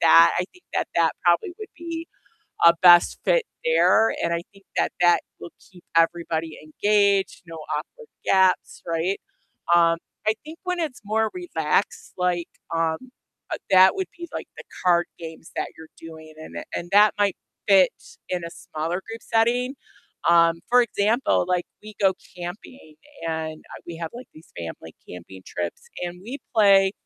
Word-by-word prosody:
that. 165 0 +7
I 180 - +1
think 360 - -22
that - - -1
that 165 -1 +3
probably 175 - +3
would 430 - -8
be 335 0 -6 0.6
a 170 - +9
best 175 -1 +7
fit - - +2 0.2
there, 355 - +4
and - - 0
I 170 - 0
think 195 -1 -21
that - - +2
that 175 0 +5 0.2
will 170 - -9 0.2
keep 180 -2 -18
everybody 165 -1 +1
engaged, 200 +5 +1
no 165 0 -9 0.2
awkward 475 -2 -8 0.2
gaps, 190 -1 +2
right? 170 +3 -1 0.5
Um, 165 -1 +4 0.3
I 215 - +5
think 315 +2 -11
when 360 -1 -2
it's 290 -9 -4
more 220 +1 0
relaxed, 355 -1 -1
like, 180 -2 0 0.3
um, 165 -1 +1 0.6
uh, - - -2
that 190 0 +7
would 380 -1 -2
be, 345 - -7
like, - - -6
the - - -10 0.2
card 175 -1 +4
games 160 -1 -10
that - - -2
you're 160 0 -12
doing, 160 -1 -11
and 155 - -10
and - - -5
and 175 - -5
that 205 +1 +6
might 205 -2 +2 0.3
fit 190 -2 +6 0.4
in 180 -1 -1
a 170 - -4
smaller 165 +4 -4
group 225 0 -7
setting. 245 +3 +1 0.5
Um, 170 -1 +5
for 250 - +7
example, 230 +1 +1
like, 180 -1 0 0.2
we 215 0 -11
go 195 -2 +4 0.2
camping 175 - -9 0.3
and, 160 -1 -4
uh, - - -9
we 170 - -7
have, 165 -2 -4
like, 245 +1 -9
these 155 - -16
family 80 -1 -8
camping 90 +2 -10
trips, 85 -1 -5 0.2
and 175 0 -5
we 250 +8 -6 0.2
play 195 -3 +5
180 Hz, 165 wpm, -24 LUFS, 165-220 Hz, 0.6 s, a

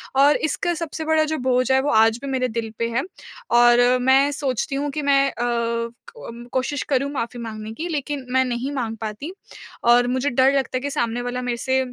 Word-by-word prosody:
और 285 +2 +5
इसका 350 +3 -1
सबसे 320 -1 -5
बड़ा 315 0 +3
जो - - -1
बोझ 255 0 +1
है 265 - +5
वो 290 - -1
आज 225 +1 +4
भी - - -4
मेरे 255 -1 0
दिल 230 -1 -4
पे 230 - 0
है। 235 +3 0 0.5
और 240 0 +6 0.2
मैं 265 +3 +4
सोचती 275 -2 -2
हूँ 285 +1 -1
कि 300 - -3
मैं 275 -1 +3
अ, - - -19
क 235 -1 -1 0.6
कोशिश 260 +2 -1
करूँ 275 0 +1
माफ़ी 245 -3 -4
माँगने 220 -1 -6
की 320 +9 -5
लेकिन 290 -3 -3
मैं 260 0 +3
नहीं 250 +2 -3
माँग 235 -5 -3
पाती। 220 +9 -5 0.5
और 240 +1 +5
मुझे 260 +3 0
डर 260 +1 +4
लगता 265 -1 -2
है - - -4
कि 285 - -3
सामने 235 -2 -1
वाला 245 +1 -3
मेरे 245 -1 -2
से 260 +2 0
255 Hz, 210 wpm, -22 LUFS, 235-280 Hz, 0.6 s, और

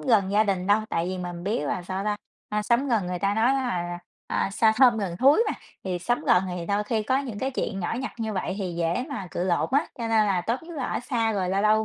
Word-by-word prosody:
gần 210 -7 +3
gia 210 +2 +4
đình 190 -3 -1
đâu, 205 +2 +4
tại 165 +1 -1
vì 185 0 -3
mình 175 -1 -5
biết 205 -2 0
là 180 +5 -2
sao 190 +2 -4
ta? 210 0 0 0.3
A, 210 0 -1
sống 235 +6 +2
gần 220 -7 +1
người 180 0 -3
ta 200 +3 +1
nói 235 +5 +3
là, 175 -10 -2 0.3
à, - - 0
"xa 220 +2 +4
thơm 245 -3 +6
gần 185 -4 -3
thúi" 275 - +5
mà, - - 0 0.3
thì 180 -2 -2
sống 240 +8 -1
gần 180 - +5
thì 180 -1 -4
đôi 205 +2 0
khi 220 0 0
có 260 +5 +1
những 250 -7 -5
cái 265 +4 -1
chuyện 215 -6 -3
nhỏ 175 - -2
nhặt 270 - -4
như 220 -1 -2
vậy 185 -1 -2
thì 185 -4 -3
dễ 170 +9 0
mà 270 -10 -5
cự 175 - -2
lộn 175 -2 +1
á, 285 +4 +3
cho 230 - -2
nên 220 -1 +4
là 190 -3 +1
tốt 230 - -2
nhất 335 0 -9
là 270 - -2
ở - - -2
xa 230 -3 0
rồi 190 -3 -1
lâu 195 +2 +1
lâu 215 +1 +4
210 Hz, 280 wpm, -26 LUFS, 180-235 Hz, 0.3 s, thơm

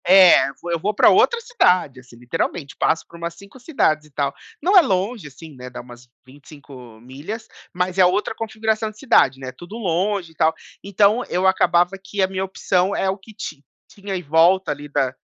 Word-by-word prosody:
É, 185 -5 +7
eu - - -10
vou 175 - -5
eu 170 - -1
vou 210 +6 -1
pra - - +6
outra 480 - +3
cidade, 180 - +1
assim, 125 -1 -17
literalmente, 140 +4 -4
passo 160 - 0
por 170 - -14
umas 170 0 -6
5 200 +7 -15
cidades, 155 - 0
e - - -22
tal. 140 -1 -2 0.3
Não 385 +4 +2
é - - +10
longe, 195 - -2
assim, 150 +2 -13
né, 125 0 -9
dá 125 - -9
umas 120 0 -15 0.2
25 135 -4 -14
milhas, 145 - -8 0.3
mas 180 +1 -2
é 185 - +7
outra 195 +5 0
configuração 220 0 -2
de 215 - -16
cidade, 135 - +3
né, 130 -1 -7
tudo 175 +9 -12
longe, 190 -2 -1
e - - -24
tal. 160 +2 +2 0.3
Então 200 +4 +2
eu 180 +2 -1
acabava 180 -1 +3
que 200 0 -4
a 190 - +3
minha 190 0 -3
opção 190 0 0
é 190 - 0
o 190 - -2
que 215 +2 -16
ti 155 -7 -8 0.2
tinha 200 -1 -7
em 180 - -5
volta, 165 +4 +3
ali, 145 0 -6
da 130 -2 0
180 Hz, 210 wpm, -21 LUFS, 145-200 Hz, 0.3 s, é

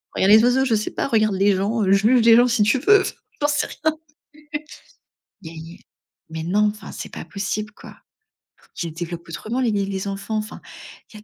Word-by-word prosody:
regarde 190 - +2
les 220 +1 +7
oiseaux, 250 +2 +3
je 235 -4 +2
sais 215 - -2
pas, - - -2
regarde 215 -5 +2
les 195 +1 +3
gens, 210 +4 -1
heu, 190 - +1
juge 220 +5 +4
les 230 -1 +8
gens 240 +1 +5
si 230 -3 +2
tu 210 +6 +2
veux, 410 +8 +5
enfin, - - -4 0.3
j'en 290 - +3
sais 295 0 0 0.2
rien. 315 0 +1 2.3
mais 160 0 -5
non! 205 +5 +2
Enfin, 215 - -11
c'est - - -8
pas - - -7
possible, 210 +1 -4
quoi! - - -13 0.8
Qu'ils 170 - -4
les 155 - -13
développent 170 0 -6
autrement 220 +9 -4
les 240 -3 +1
les 195 -1 -2
enfants, 200 +2 -4
enfin, 215 0 -5 0.5
il - - -10
y - - -17
215 Hz, 200 wpm, -22 LUFS, 195-240 Hz, 2.3 s, les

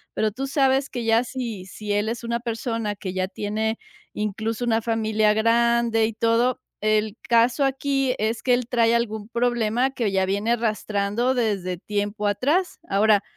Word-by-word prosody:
pero 215 -1 +1
tú 270 +6 -4
sabes 270 0 +2
que 245 -3 -4
ya 225 +2 +4
si 235 -7 -5
si 205 +1 -4
él 205 +2 0
es 235 +1 -4
una 235 0 -1
persona 225 -2 -3
que 190 -1 -6
ya 185 0 -1
tiene, 220 +3 -2 0.4
incluso 220 +3 -2
una 225 -1 +2
familia 220 -2 +1
grande 230 0 +3
y 225 - -5
todo, 230 +3 +1 0.2
el 215 0 +1
caso 235 +4 +4
aquí 270 -1 0
es 220 +2 -1
que, 250 -2 +3
él 245 -1 -3
trae 235 -2 +3
algún 220 -2 -2
problema 240 +1 +1
que 230 -6 -1
ya 190 -1 +2
viene 205 +5 0
arrastrando 215 +1 0
desde 195 -7 -1
tiempo 205 +2 -3
atrás. 295 - 0
Ahora, 205 0 +4
225 Hz, 165 wpm, -24 LUFS, 210-240 Hz, 0.4 s, ya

